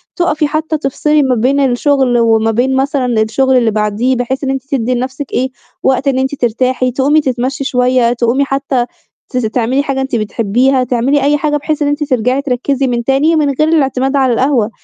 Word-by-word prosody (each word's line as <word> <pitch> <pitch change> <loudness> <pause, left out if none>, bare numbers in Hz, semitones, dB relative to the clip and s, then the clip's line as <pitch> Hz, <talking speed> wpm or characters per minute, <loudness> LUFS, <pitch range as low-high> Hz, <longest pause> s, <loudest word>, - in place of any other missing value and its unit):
تُقفي 315 -4 0
حتّى 310 +1 -2
تفصِلي 300 +1 0
ما 260 -2 +1
بين 260 +5 +1
الشغل 265 -1 +2
وما 225 -1 +2
بين 250 +4 0
مثلًا 265 -4 0
الشغل 260 +4 +1
اللي 235 -3 +2
بعديه، 215 +4 0
بحيث 255 +3 -3
إن 270 - -1
أنتِ 270 -1 -2
تدي 255 -2 0
لنفْسِك 260 +3 -5
إيه، 260 +1 0 0.3
وقت 265 +1 +1
إن 265 -1 +1
أنتِ 265 +2 -1
ترتاحي، 255 +1 0
تقومي 280 +5 +2
تتمشي 260 0 -2
شوية 250 -2 +1
تقومي 245 +3 +1
حتّى 270 -2 -1 0.4
تس 250 - -1
تعملي 245 +4 0
حاجة 270 -1 -2
أنتِ 265 -2 -2
بتحبيها، 235 +5 +1
تعملي 255 +3 0
أي 290 +1 +2
حاجة 295 0 0
بحيث 305 +1 -3
إن 290 - +1
أنتِ 290 +1 -1
ترجَعي 255 -1 0
تركّزي 270 0 -1
من 240 -1 -1
تاني 275 +6 +2
من 300 -2 +2
غير 310 - +3
الاعتماد 270 -3 +1
على 265 -3 +2
القهوة، 250 -3 +1
265 Hz, 190 wpm, -14 LUFS, 245-280 Hz, 0.4 s, غير